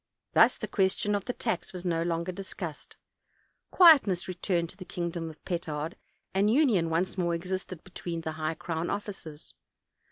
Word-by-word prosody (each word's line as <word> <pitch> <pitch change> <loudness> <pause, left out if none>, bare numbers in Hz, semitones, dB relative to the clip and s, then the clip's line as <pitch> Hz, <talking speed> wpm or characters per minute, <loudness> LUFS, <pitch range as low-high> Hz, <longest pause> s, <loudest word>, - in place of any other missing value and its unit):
Thus - - +6
the - - -4
question 200 +1 +1
of 200 -1 -1
the 245 - -2
tax 225 -8 -2
was 180 0 -6
no 165 -2 +1
longer 170 +1 -1
discussed; 175 -4 -7 0.7
quietness 280 - +6
returned 175 -2 -1
to 185 - -19
the 190 - -7
kingdom 170 -2 -4
of 155 - -14
Petard, 165 -3 -3 0.4
and 195 +2 +3
union 225 - +3
once 175 +3 0
more 170 -1 +1
existed 185 0 -5
between 175 -3 -5
the 160 - -3
high 155 0 -2
crown 165 +1 -3
officers. 190 -7 -6
175 Hz, 160 wpm, -29 LUFS, 165-195 Hz, 0.7 s, Thus